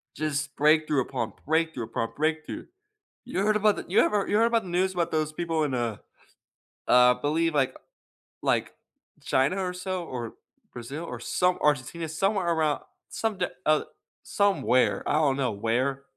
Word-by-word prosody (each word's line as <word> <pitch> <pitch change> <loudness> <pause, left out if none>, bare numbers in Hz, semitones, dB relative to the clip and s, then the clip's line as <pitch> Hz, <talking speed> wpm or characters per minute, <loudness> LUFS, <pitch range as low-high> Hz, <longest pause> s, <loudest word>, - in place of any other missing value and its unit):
Just 150 -1 -2
breakthrough, 150 -1 +3
upon 120 -4 -3
breakthrough, 160 -5 0
upon 115 0 -3
breakthrough. 155 +1 -2 0.6
You 240 -6 -2
heard 210 +1 +2
about 210 0 +3
the - - -6
you 185 - +3
ever 205 -2 +2
you 205 - +2
heard 225 - +5
about 230 -1 +1
the 185 - -8
news 185 +2 +1
about 175 -2 -1
those 155 -1 0
people 165 0 -1
in, 145 -3 -1
uh, 120 -4 -1 0.9
I 125 0 +6
believe, 160 +3 +1
like 135 -3 +1 0.7
like - - +1 0.5
China, 135 +8 +1
or 180 -1 -2
so? 180 -1 -4
Or, 120 -6 -5 0.4
Brazil? 135 +7 -6
Or, - - -6
some 180 0 +1
Argentina? 150 +3 0
Somewhere 195 +3 0
around 155 -3 +1 0.3
somed 205 -5 -1 0.2
uh, 155 0 +3 0.4
somewhere, 130 - +2
I - - +1
don't 145 -3 +2
know 130 -4 0
where. 125 +6 -1
155 Hz, 160 wpm, -27 LUFS, 135-180 Hz, 0.9 s, I